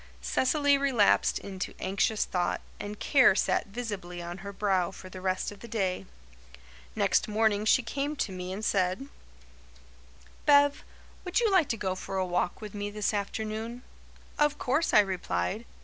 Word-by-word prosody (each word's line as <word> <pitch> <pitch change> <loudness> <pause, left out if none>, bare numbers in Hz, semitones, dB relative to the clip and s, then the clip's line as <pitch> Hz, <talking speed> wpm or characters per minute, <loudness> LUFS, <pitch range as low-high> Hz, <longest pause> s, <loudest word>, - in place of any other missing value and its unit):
Cecily 285 +1 +2
relapsed 260 -7 +3
into 190 -2 -6
anxious 200 +3 0
thought, 175 -1 -1 0.2
and 205 0 -6
care 260 -9 +5
sat - - +1
visibly 200 -5 -5
on 175 +2 -6
her 200 +2 -7
brow 195 -3 +1
for 190 -1 -11
the 185 0 -9
rest 185 +1 -1
of 205 - -12
the 235 - -10
day. 195 -5 -2 0.9
Next - - +2
morning 215 -1 +1
she 245 +3 +4
came 280 +5 -2
to 220 - -2
me 180 0 -5
and 205 +3 -4
said: 190 +8 0 1.4
"Bev, 285 0 +5 0.4
would 360 +3 +1
you 455 -3 +2
like 370 -7 +4
to 230 - 0
go 190 -3 -1
for 190 +1 -5
a 190 - +1
walk 180 +1 -1
with 210 -2 -7
me 205 0 -3
this 210 +1 -1
afternoon?" 220 +4 -4 0.6
"Of 295 -1 +3
course," 285 +6 +1
I 210 - +7
replied. 90 - -2
205 Hz, 165 wpm, -29 LUFS, 185-250 Hz, 1.4 s, I